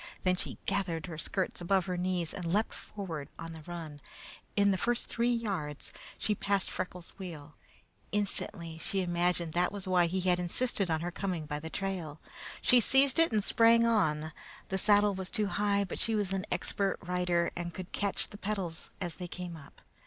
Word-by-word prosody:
Then 185 0 +3
she - - -5
gathered 170 -5 0
her 160 -3 -6
skirts 185 +1 -2
above 190 +1 +2
her 180 -1 -2
knees 180 -2 -1
and 170 -3 -3
leaped 210 +4 +2
forward 165 -8 -6
on 165 0 -6
the 160 - -9
run. 160 -4 -6 0.5
In 200 0 +5
the 190 - +2
first 240 +3 +1
three 235 +1 +1
yards 195 -11 -2 0.2
she 210 - +1
passed 200 -1 +1
Freckles' 180 -1 -5
wheel. 155 -6 -7 0.6
Instantly 170 -5 -1
she 195 +4 0
imagined 175 -1 0
that 175 +1 +2
was 200 -2 -5
why 180 -2 +4
he 185 +2 -1
had 180 -1 +3
insisted 195 +2 +2
on 160 -1 +1
her 175 +1 -2
coming 175 -3 -2
by 150 -1 -3
the 160 +2 -6
trail. 175 -6 -3 0.4
She 250 - +7
seized 270 +4 +5
it 330 -3 +5
and 215 -2 +2
sprang 230 +2 +5
on. 160 -9 +2 0.4
The 190 - 0
saddle 205 0 +5
was 190 -1 -4
too 215 -2 0
high, 200 0 +2
but 195 - -5
she 225 - +1
was 200 -3 0
an 195 +1 -2
expert 200 -1 0
rider 180 -1 +1
and 175 0 -3
could 185 +1 -7
catch 200 -1 0
the 205 - -10
pedals 190 -5 -3
as 175 -4 -3
they 180 - -4
came 175 -1 -5
up. 150 -3 -14
185 Hz, 190 wpm, -31 LUFS, 170-200 Hz, 0.6 s, She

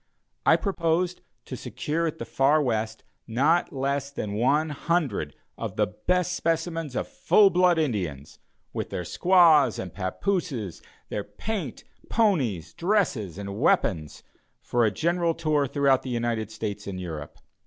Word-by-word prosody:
I - - +8
proposed 175 -2 0 0.2
to - - -6
secure 165 +3 -2
at 160 - -4
the - - -5
far 140 +3 +3
West 110 -5 -1 0.2
not 145 +9 +2
less 140 0 -1
than 105 -7 -4
one 145 +8 +2
hundred 145 - -1 0.2
of - - -4
the - - +3
best 180 -1 -1
specimens 165 -4 -1
of - - -1
full 200 -2 +4
blood 180 -1 +4
Indians, 90 - -2 0.3
with - - -3
their 90 - -4
squaws 170 - +5
and 90 -3 -6
papooses, 105 - -2 0.3
their 105 - -3
paint, 150 - -5 0.3
ponies, 140 - +1
dresses, 165 - 0
and 100 -1 -6
weapons, 75 -3 +1 0.4
for 120 -1 +1
a - - +4
general 170 - 0
tour 155 -3 +1
throughout 135 0 +3
the 130 - -7
United 115 -3 -1
States 105 -2 -5
and 95 -2 -4
Europe. 80 -5 -7
140 Hz, 145 wpm, -26 LUFS, 105-170 Hz, 0.4 s, I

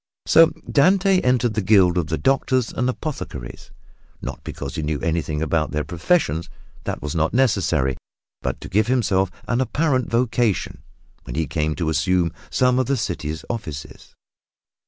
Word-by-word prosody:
So 165 0 +7 0.2
Dante 190 +5 +4
entered 125 -2 +2
the 110 - 0
guild 95 -3 +4
of 85 -4 0
the 80 0 -1
Doctors 130 -2 +1
and 125 +1 0
Apothecaries 125 - -6 0.5
not - - -7
because 70 -2 -6
he - - -3
knew 75 -1 -2
anything 80 -2 -1
about 80 0 0
their 75 0 -2
professions 85 - 0 0.4
that - - -4
was 75 - -3
not 80 +5 0
necessary 85 - +2 0.5
but - - -3
to - - -7
give 105 +3 +1
himself 100 -7 +2 0.2
an 125 +1 +1
apparent 130 0 0
vocation 115 -3 0 0.4
when - - -6
he 80 +1 0
came 75 +1 -1
to 80 -3 -1
assume 85 +3 +1 0.2
some 125 0 +2
one - - +4
of - - -1
the 140 - +1
city 80 -8 -3 0.2
offices. 80 -12 -7
95 Hz, 160 wpm, -22 LUFS, 80-125 Hz, 0.5 s, So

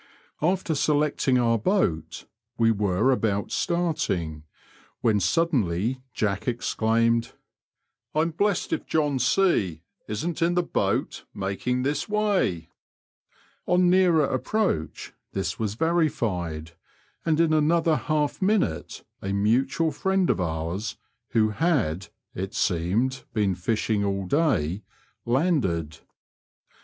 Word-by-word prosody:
After 180 +1 +1
selecting 145 -3 +1
our 115 -2 +2
boat 105 - 0 0.3
we 115 0 +4
were 105 +3 +2
about 105 -5 0
starting, 95 - -1 0.6
when 110 -3 +3
suddenly 120 - +1
Jack 105 -1 -2
exclaimed, 115 -1 +1 0.8
I'm 160 +2 +2
blessed 200 +3 0
if - - -3
John 145 -4 +1
C 115 - +2 0.2
isn't 160 +11 -3
in 170 +1 +2
the 180 - +2
boat - - -1
making 100 +6 -2
this 145 +8 -1
way." 195 - 0 1.0
On 180 0 +4
nearer 180 -5 +4
approach 130 - -2 0.2
this 90 -3 -2
was 105 -2 -2
verified, 105 - -1 0.5
and 160 -1 +1
in 165 -2 +3
another 160 +1 +3
half 150 +1 -1
minute 185 - 0 0.2
a 95 - -3
mutual 130 +10 +1
friend 190 +5 +1
of - - -1
ours, 85 +5 -3 0.4
who 110 -1 +3
had, 105 - 0 0.3
it 95 +1 -5
seemed, 100 +10 0
been 105 -3 +2
fishing 105 +3 -1
all 100 -1 -1
day, 105 - +1 0.5
landed. 115 - 0
120 Hz, 110 wpm, -25 LUFS, 95-160 Hz, 1.0 s, we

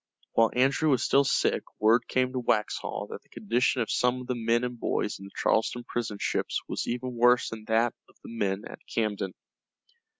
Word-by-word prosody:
While 115 0 +4
Andrew 135 +5 +3
was 130 -4 +3
still 140 - +4
sick - - +1 0.2
word 115 +3 +4
came 130 0 +1
to 130 - -1
Waxhaw 105 -3 -1
that - - -7
the - - -33
condition 120 +4 +1
of 110 - -5
some 125 +1 +2
of - - -8
the 125 - -1
men 115 0 +1
and 125 -1 -4
boys 105 - -1
in 95 - -10
the 100 - -11
Charleston 120 +2 +1
prison 120 -3 -3
ships - - -1
was - - -3
even 125 +1 -3
worse 120 +1 +4
than 110 -1 -8
that 115 +1 +2 0.2
of - - -23
the 115 - -9
men 100 -2 -1
at - - -10
Camden. 105 -4 -2
120 Hz, 200 wpm, -28 LUFS, 110-125 Hz, 0.2 s, While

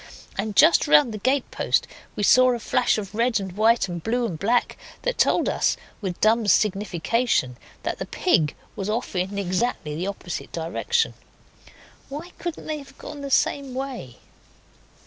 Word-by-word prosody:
And 205 +1 -3
just 320 +1 +6
round 285 -5 +5
the 215 - -5
gatepost 260 +4 +1 0.3
we 210 - -2
saw 255 +4 +6
a - - -5
flash 220 - +1
of 200 -2 -5
red 230 +1 +1
and 190 -2 -5
white 220 +4 +3
and 175 -2 -5
blue 240 +6 0
and 175 -8 -4
black 235 +4 +1 0.3
that - - -1
told - - +3
us, - - +1 0.2
with 185 -4 -4
dumb 220 0 +3
signification, 205 - +1 0.3
that - - -3
the - - -4
pig 160 - +1 0.2
was 195 +1 -4
off 225 -1 -2
in 185 +2 -1
exactly 185 -3 -1
the 175 +5 -3
opposite 195 -3 -5
direction. 175 - -1 1.0
Why 305 +6 -7
couldn't 345 -2 -5
they 310 -1 -3
have 275 -1 -14
gone 290 - -8
the 280 - -5
same 275 -1 +1
way? 255 - -5
220 Hz, 165 wpm, -24 LUFS, 190-260 Hz, 1.0 s, just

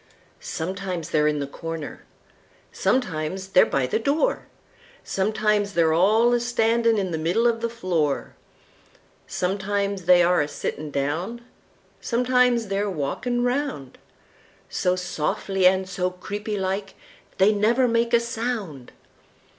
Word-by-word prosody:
Sometimes 180 -1 -4
they're 150 -1 +3
in 150 0 +1
the 140 - -2
corner, 165 +2 -7 0.7
sometimes 190 -5 -1
they're 185 - +5
by 135 -2 0
the 130 - -1
door, 290 - 0 0.6
Sometimes 210 0 0
they're 165 -2 +3
all 215 +8 +4
a 240 - +3
standin' 230 -1 +2
in 190 -3 -1
the 160 - -2
middle 170 +8 +1
uv 235 -1 +2
the 235 - -1
floor; 175 -11 -1 0.9
Sometimes 200 0 -2
they 175 0 +6
are 175 -1 +3
a 145 - -1
sittin' 150 0 -5
down, 160 +12 -2 0.6
sometimes 250 -1 +2
they're 200 +1 -1
walkin' 220 - -2
roundSo 245 - -4
softly 180 +2 0
and 190 0 +2
so 180 0 -1
creepy 205 +4 -5
like 195 +1 -3 0.4
they 200 +3 +5
never 230 +5 +3
make 230 0 +1
a 235 - +5
sound! 225 - -4
195 Hz, 125 wpm, -24 LUFS, 170-230 Hz, 0.9 s, they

